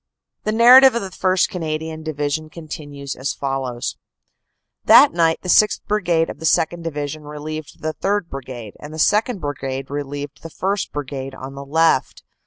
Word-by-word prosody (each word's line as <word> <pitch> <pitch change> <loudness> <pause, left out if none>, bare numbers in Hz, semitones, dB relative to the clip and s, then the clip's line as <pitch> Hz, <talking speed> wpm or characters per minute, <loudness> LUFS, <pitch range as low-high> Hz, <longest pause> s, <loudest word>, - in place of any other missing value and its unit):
The 215 - +1
narrative 250 +3 +8
of 235 - -1
the 195 - -5
1st. 185 0 +2
Canadian 160 -2 -4
Division 155 0 -3
continues 145 -4 -7
as 130 +2 -3
follows: 135 -3 -3 0.9
"That 285 - +8
night 165 -1 +2
the - - -6
6th. 210 +3 +4
Brigade 175 -6 +1
of - - -8
the 160 - -6
2nd. 165 +2 +2
Division 150 -2 -4
relieved 150 +1 -8
the 155 0 -1
3rd. 200 0 -1
Brigade, 125 -7 -8
and 150 +1 -9
the - - -7
2nd. 210 +6 +2
Brigade 135 -3 -4
relieved 145 0 -5
the 165 - -8
1st. 195 +5 -2
Brigade 135 -2 -5
on 130 +1 -8
the 140 0 -8
left. 160 -1 +1
155 Hz, 165 wpm, -20 LUFS, 140-175 Hz, 0.9 s, narrative